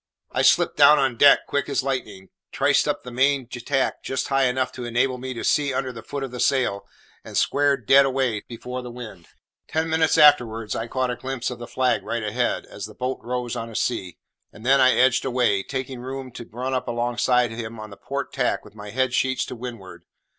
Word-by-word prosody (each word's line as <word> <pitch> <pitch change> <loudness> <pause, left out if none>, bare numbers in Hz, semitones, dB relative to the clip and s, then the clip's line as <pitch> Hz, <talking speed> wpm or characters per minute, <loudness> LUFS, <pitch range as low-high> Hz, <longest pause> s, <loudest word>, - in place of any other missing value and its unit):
I - - 0
slipped - - +3
down 150 - +7
on 135 -4 +1
deck, 140 +4 +6
quick 140 -2 -2
as - - 0
lightning, 105 -8 -4 0.2
triced - - +2
up - - -1
the 125 - -8
main 135 +2 +2
tack 130 +2 -2
just 135 +1 -3
high 135 -1 +3
enough 130 +1 0
to 125 - -8
enable 125 +2 0
me 130 0 -5
to 115 - -5
see 140 -3 +1
under 130 -1 -2
the 115 -2 -9
foot 140 +5 -5
of 135 - -5
the 125 - -7
sail, 125 -8 +1 0.4
and - - -6
squared 140 -4 +2
dead 135 +5 +7
away 130 -5 0
before 125 +2 -6
the 125 - -8
wind. 115 -8 -10 0.4
Ten 160 0 -1
minutes 160 0 +2
afterwards 115 -8 +4
I 115 - -3
caught 130 +1 -1
a - - -3
glimpse 130 0 -4
of 125 - -7
the 120 - -7
flag 130 -1 +1
right 115 -1 -3
ahead, 120 +3 -1
as - - -8
the - - -14
boat 130 +1 -3
rose 125 -1 -3
on 115 0 -5
a 115 - -11
sea; 95 -8 -2 0.3
and 110 - -14
then 135 +1 +5
I 130 0 +6
edged 130 -1 +3
away, 120 -6 +1
taking 130 +2 -5
room 130 +1 -6
to 120 -1 -10
run 125 +3 -3
up 130 - -2
alongside 120 0 +1
him 115 0 -6
on 110 -1 -8
the - - -9
port - - -5
tack - - -1
with - - -15
my 105 -1 -9
head 130 +3 0
sheets 130 +1 +1
to - - -7
windward. 115 -6 -9
125 Hz, 220 wpm, -23 LUFS, 115-130 Hz, 0.4 s, down